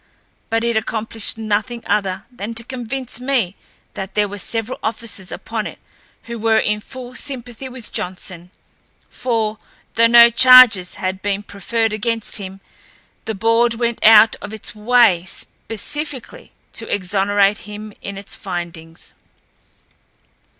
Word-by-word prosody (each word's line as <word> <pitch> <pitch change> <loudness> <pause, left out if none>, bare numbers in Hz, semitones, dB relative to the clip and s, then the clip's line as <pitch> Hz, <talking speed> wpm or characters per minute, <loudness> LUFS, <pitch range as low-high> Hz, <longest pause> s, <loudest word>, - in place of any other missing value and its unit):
But 225 0 0
it 235 -1 0
accomplished 220 0 -3
nothing 220 +2 -2
other 195 -1 -1
than 230 -2 -6
to 230 - -3
convince 250 0 -4
me 250 -8 0 0.4
that 190 0 -7
there 210 -1 +2
were 205 +1 -7
several 225 +4 -3
officers 220 -4 -5
upon 225 -2 -4
it - - -10 0.5
who 235 -1 -7
were 220 0 +3
in 210 -1 +1
full 250 +2 -9
sympathy 255 -2 -4
with 250 -3 -9
Johnson, 180 -1 -5 0.6
for, 220 -3 -1 0.3
though 230 0 +5
no 235 0 +8
charges 250 -7 +8
had 185 0 -3
been 205 0 -2
preferred 220 +3 -2
against 225 +1 -1
him, 195 -1 -8 0.6
the 220 - -3
board 230 +3 +2
went 235 0 -2
out 220 0 +8
of 205 +1 -7
its 220 - -6
way 215 -5 +4
specifically 290 - -6 0.2
to - - -4
exonerate 200 +1 +2
him 210 0 -8
in 200 -1 -7
its 200 0 -7
findings. 170 -3 -7
220 Hz, 135 wpm, -19 LUFS, 200-235 Hz, 0.6 s, no